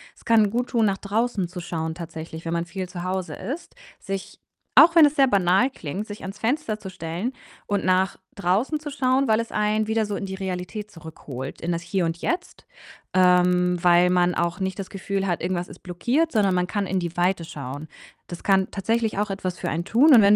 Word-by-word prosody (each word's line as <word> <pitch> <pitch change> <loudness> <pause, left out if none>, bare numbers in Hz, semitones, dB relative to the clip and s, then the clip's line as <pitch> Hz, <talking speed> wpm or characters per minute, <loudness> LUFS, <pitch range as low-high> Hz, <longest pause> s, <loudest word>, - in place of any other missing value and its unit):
Es - - -22
kann 220 -3 +5
guttun, 235 0 +1
nach 195 - 0
draußen 210 -1 -1
zu 180 - -7
schauen 160 -2 -3
tatsächlich, 160 -1 -8
wenn 165 - -2
man 170 0 -1
viel 185 +1 -5
zu 175 -1 -6
Hause 185 0 -3
ist. 275 - -6 0.2
Sich 195 -1 -6 0.4
auch 335 +1 +8
wenn 315 -3 +9
es 290 - -3
sehr 275 - +6
banal 195 +4 +3
klingt, 190 - -5
sich 205 -1 -9
ans 195 +2 -7
Fenster 225 0 -1
zu 190 -3 -8
stellen 180 +8 -4 0.3
und 205 -1 -1
nach 185 0 +2 0.2
draußen 200 - +1
zu 295 -1 -6
schauen, 265 0 +2
weil 220 0 +3
es 230 - -4
einen 210 0 +1
wieder 220 0 +1
so 205 - -3
in 195 - -4
die 190 - -5
Realität 190 +2 -5
zurückholt, 145 -5 -8
in 170 - -2
das 170 0 -1
Hier 175 +1 -1
und 165 0 -2
Jetzt. 350 - -4 0.5
Ähm, 180 -1 +4
weil 175 +1 +5
man 180 -1 +3
auch 170 +2 -1
nicht 190 -1 -2
das 195 - -6
Gefühl 195 0 -2
hat, 175 -3 -1
irgendwas 175 0 -2
ist - - -13
blockiert, 245 - 0
sondern 200 -4 +2
man 180 0 +1
kann 205 +1 -1
in 190 0 0
die 170 -1 -5
Weite 175 0 +1
schauen. 145 -1 -7 0.4
Das 175 - -8
kann 190 -1 +3
tatsächlich 225 +2 -1
auch 205 0 0
etwas 185 -2 -3
für - - -4
einen 170 +2 -1
tun 275 +9 +5
und 230 - +9
wenn 200 +1 +6
190 Hz, 215 wpm, -24 LUFS, 175-215 Hz, 0.5 s, wenn